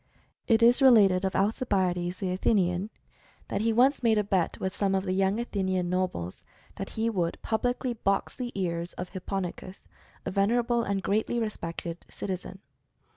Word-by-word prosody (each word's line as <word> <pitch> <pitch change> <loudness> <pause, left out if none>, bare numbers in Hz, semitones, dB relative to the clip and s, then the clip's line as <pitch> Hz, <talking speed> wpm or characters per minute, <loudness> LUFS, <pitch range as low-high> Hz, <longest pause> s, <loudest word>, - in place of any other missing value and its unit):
It 230 -1 +4
is 240 +3 +6
related 205 -8 +6
of 190 - -1
Alcibiades, 190 -5 0
the 190 -2 -2
Athenian, 185 0 +1 0.6
that - - -1
he 225 +1 +2
once 255 +5 +3
made 225 -3 +3
a 210 - +3
bet 190 -4 0
with 190 0 -3
some 195 -1 +1
of 190 - 0
the 185 -1 -1
young 195 +3 +1
Athenian 190 -6 -1
nobles, 180 - -2 0.3
that - - -5
he 225 +1 +1
would 180 -7 -1
publicly 245 +2 -1
box 195 -3 -1
the 245 -2 -4
ears 170 -1 -2
of 180 0 -6
Hip 185 -2 -9
ponikos, 185 0 -5 0.4
a - - -2
venerable 235 +5 +2
and 200 -4 -2
greatly 220 +4 0
respected 170 -6 -4
citizen. 190 0 -6
195 Hz, 165 wpm, -28 LUFS, 185-225 Hz, 0.6 s, is